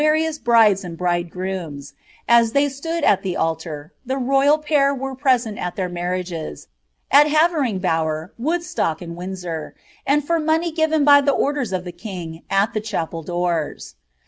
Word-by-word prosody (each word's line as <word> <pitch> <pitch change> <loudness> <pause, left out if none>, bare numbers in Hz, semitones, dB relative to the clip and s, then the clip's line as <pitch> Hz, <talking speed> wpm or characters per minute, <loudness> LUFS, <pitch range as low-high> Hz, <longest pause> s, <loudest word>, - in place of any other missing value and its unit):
133 305 +1 +4 0.2
firious - - -33
brides 220 -4 +4
and 170 -2 -7
bridegrooms, 175 -4 -3 0.3
as 235 -1 +4
they 285 +1 +3
stood 325 +4 -4
at 195 -7 +4
tlie 190 -3 -3
altar 160 -1 -3
— - - -46
the 260 +1 -2
royal 275 +3 +3
pair 290 -2 +2
were 270 0 -4
present 255 -5 +1
at 180 - -4
their 185 -2 -2
marriages, 175 - -4 0.4
at 290 +2 +7
Havering 305 - +2
Bower, 160 -1 -1
Woodstock, 305 - -1
ind 170 -1 -7
Windsoi^— 180 -3 -6 0.3
and 290 +1 +2
for 335 +2 +1
money 320 +2 +1
given 315 -1 +1
by 285 -1 +7
the 280 0 +2
orders 275 -4 -1
of 185 -1 -2
tlie 175 -1 -10
king, 175 -5 -7
at 195 +3 +2
the 215 - -1
cbapel 165 -6 -4
doors. 175 -2 -2
205 Hz, 170 wpm, -21 LUFS, 175-285 Hz, 0.4 s, at